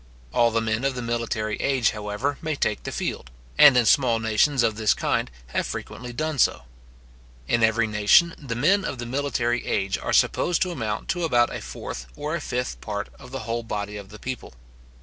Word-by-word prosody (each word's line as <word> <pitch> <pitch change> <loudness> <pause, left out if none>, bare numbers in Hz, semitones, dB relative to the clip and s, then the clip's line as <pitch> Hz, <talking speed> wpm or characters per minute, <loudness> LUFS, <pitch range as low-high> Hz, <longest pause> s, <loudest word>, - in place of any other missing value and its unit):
All 120 -1 +4
the 115 0 0
men 110 +2 -1
of 135 -1 0
the 125 - -4
military 115 -2 -2
age, 130 -5 +2
however, 105 +7 -3
may 155 -1 -2
take 105 -6 -1
the - - -5
field, 65 - -4 0.3
and 140 -4 +8
in 120 - +4
small 120 -2 +4
nations 115 +5 +2
of 110 - +1
this 110 -1 +2
kind, - - 0 0.2
have - - 0
frequently 125 -1 -6
done 155 +4 -3
so. - - +3 0.8
In 120 - +2
every 110 +1 +3
nation, 105 +11 +4
the 130 -6 -5
men 185 - +3
of 145 - -3
the 120 - -5
military 120 -2 -1
age 95 0 -1
are - - -3
supposed 175 -1 +2
to 185 - -3
amount 110 -9 -3
to 175 -2 -1
about 120 -7 +2
a - - -5
fourth - - -7
or - - -4
a - - -2
fifth 125 +1 -3
part 105 -1 -4
of - - -12
the 135 0 -5
whole 115 +1 -2
body 105 -2 -4
of 100 -2 -8
the 105 - -11
people. 125 - -7
120 Hz, 205 wpm, -24 LUFS, 110-135 Hz, 0.8 s, and